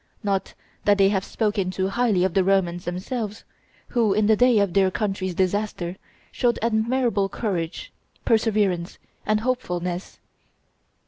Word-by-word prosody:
Not 195 -2 -1 0.3
that 205 -1 +4
they 195 -1 +5
have 195 -2 0
spoken 205 -4 -1
too 190 +1 -1
highly 215 -4 +2
of 185 -2 +1
the 190 - +3
Romans 180 -2 +1
themselves, 205 +5 -4 0.5
who, 225 -5 +2
in 215 0 +2
the 220 +1 +5
day 245 +1 +4
of 200 -4 +2
their 195 -1 +4
country's 190 -2 -2
disaster, 190 -1 -1 0.4
showed 240 -2 +1
admirable 230 -2 +1
courage, 180 -6 -3 0.3
perseverance, 205 -6 +1 0.3
and 215 +1 +2
hopefulness. 180 -7 -3
200 Hz, 135 wpm, -24 LUFS, 185-220 Hz, 0.5 s, they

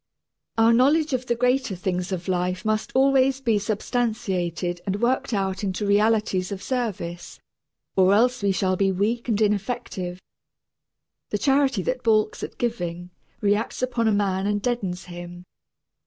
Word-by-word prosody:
Our 225 +1 +5
knowledge 290 +5 +3
of 255 0 -2
the 235 - +1
greater 250 -3 +1
things 180 0 -2
of 185 -1 -4
life 180 +1 -1
must 215 0 0
always 270 0 +4
be 230 -6 +1
substantiated 195 -5 -2
and 195 +1 -1
worked 245 +3 +1
out 195 -2 -1
into 195 +1 -2
realities 205 -2 +2
of 195 -1 -5
service, 200 -9 -4 0.6
or 190 0 +5
else 245 +4 +3
we 200 -1 +2
shall 185 0 +1
be 195 +1 +2
weak 220 +6 -1
and 215 -2 +1
ineffective. 200 -4 -1 1.1
The - - -1
charity 270 -7 +2
that 255 +5 -2
balks 215 -2 +2
at - - -6
giving, 180 -7 -3 0.3
reacts 210 +4 0
upon 240 -3 0
a - - +4
man 200 -1 0
and 205 0 +1
deadens 200 -6 -2
him. 175 0 -9
205 Hz, 150 wpm, -24 LUFS, 185-240 Hz, 1.1 s, Our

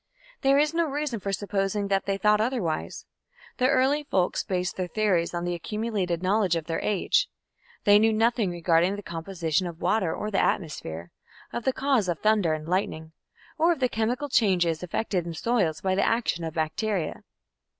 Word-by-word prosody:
There 275 +1 +4
is 300 +2 +2
no 335 0 +2
reason 290 -5 -2
for 200 0 -3
supposing 200 +1 -1
that 195 0 0
they 195 0 0
thought 210 +1 +3
otherwise. 220 -9 -2 0.5
The 255 0 +3
early 275 +3 +2
folks 185 -10 0
based 180 -1 -2
their 185 -1 -2
theories 185 -3 +1
on 175 0 -3
the 175 0 -1
accumulated 190 -2 -2
knowledge 190 -2 +2
of 165 -2 -3
their 165 - -2
age. 205 -4 +1 0.5
They 205 0 +6
knew 220 +1 +4
nothing 225 -1 +2
regarding 175 +2 +2
the 205 - -8
composition 170 0 -2
of 170 -1 -8
water 195 -6 +1
or 210 - -4
the 195 - +2
atmosphere, 85 - -3 0.4
of 240 - -4
the 265 - +3
cause 260 -7 +1
of 170 - 0
thunder 210 -6 +2
and 155 0 -8
lightning, 165 -3 -2 0.5
or 335 +2 +4
of 320 - -9
the 255 -2 +2
chemical 240 +6 -1
changes 180 - +2
effected 180 -1 -2
in 165 - -5
soils 195 -8 0
by 190 -1 0
the 195 - +2
action 225 -7 0
of 160 0 -5
bacteria. 165 +3 -2
195 Hz, 180 wpm, -26 LUFS, 170-225 Hz, 0.5 s, They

